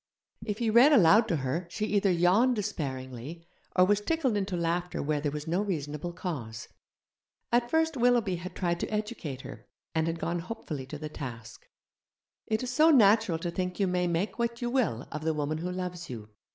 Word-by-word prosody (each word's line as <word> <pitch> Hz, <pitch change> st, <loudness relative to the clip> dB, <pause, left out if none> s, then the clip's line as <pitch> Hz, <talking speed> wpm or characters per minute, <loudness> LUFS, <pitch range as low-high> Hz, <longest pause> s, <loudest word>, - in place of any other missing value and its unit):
If 210 Hz, -2 st, -3 dB
he 230 Hz, -1 st, 0 dB
read 245 Hz, +7 st, +7 dB
aloud 215 Hz, -, +6 dB
to 175 Hz, -, +1 dB
her 145 Hz, +5 st, -2 dB
she 215 Hz, +4 st, -2 dB
either 205 Hz, -2 st, +2 dB
yawned 185 Hz, +9 st, +4 dB
despairingly, 145 Hz, -, -5 dB, 0.3 s
or 180 Hz, -, +6 dB
was 205 Hz, +2 st, +2 dB
tickled 275 Hz, -2 st, 0 dB
into 195 Hz, -2 st, -1 dB
laughter 170 Hz, +1 st, -1 dB
where 150 Hz, 0 st, -1 dB
there 145 Hz, -1 st, -1 dB
was 150 Hz, 0 st, -5 dB
no 175 Hz, +4 st, +1 dB
reasonable 155 Hz, -4 st, -3 dB
cause. 125 Hz, -, -5 dB, 0.8 s
At 240 Hz, 0 st, +2 dB
first 320 Hz, +1 st, +2 dB
Willoughby 240 Hz, -7 st, +2 dB
had 180 Hz, +2 st, -8 dB
tried 175 Hz, -2 st, -1 dB
to -, -, -2 dB
educate 210 Hz, -, -4 dB
her, -, -, -10 dB, 0.3 s
and 160 Hz, 0 st, +1 dB
had 165 Hz, 0 st, -1 dB
gone 170 Hz, +1 st, -2 dB
hopefully 165 Hz, -8 st, -6 dB
to 150 Hz, -, -6 dB
the 155 Hz, +1 st, -5 dB
task. 120 Hz, -7 st, -8 dB, 0.8 s
It 220 Hz, +2 st, 0 dB
is 250 Hz, -, -3 dB
so 310 Hz, +5 st, +5 dB
natural 215 Hz, -, +5 dB
to 170 Hz, +1 st, -4 dB
think 180 Hz, +1 st, -3 dB
you 200 Hz, -, +3 dB
may 180 Hz, -1 st, 0 dB
make 175 Hz, +7 st, -1 dB
what 235 Hz, 0 st, -1 dB
you 240 Hz, -1 st, -2 dB
will 215 Hz, -, 0 dB
of 150 Hz, -, -4 dB
the 160 Hz, 0 st, 0 dB
woman 150 Hz, +1 st, -2 dB
who 180 Hz, +2 st, -3 dB
loves 180 Hz, -1 st, -5 dB
you. 110 Hz, -4 st, -7 dB
180 Hz, 195 wpm, -29 LUFS, 155-215 Hz, 0.8 s, read